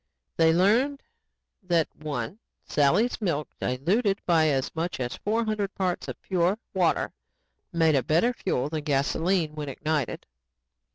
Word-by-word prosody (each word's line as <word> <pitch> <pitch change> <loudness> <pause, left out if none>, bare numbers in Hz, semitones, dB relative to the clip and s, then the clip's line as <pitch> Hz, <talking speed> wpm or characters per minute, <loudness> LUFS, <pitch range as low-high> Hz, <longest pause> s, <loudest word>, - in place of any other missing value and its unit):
They 160 0 +5
learned 230 - +2 0.6
that 170 -4 +1
(1) 150 - -4 0.3
Sally's 180 - +2
milk, 155 -7 -1
diluted 195 - +1
by 165 -3 +4
as 135 -1 0
much 165 0 -2
as 125 -1 -2
four 225 +3 -1
hundred 210 -2 -2
parts 185 -2 -1
of - - -6
pure 185 +1 +1 0.2
water, 180 -3 +1 0.6
made 165 -2 +3
a 135 - +3
better 170 - +2
fuel 140 - -1
than 155 0 -4
gasoline 155 +4 +1
when 150 -2 -5
ignited. 150 -1 -2
165 Hz, 135 wpm, -26 LUFS, 150-195 Hz, 0.6 s, They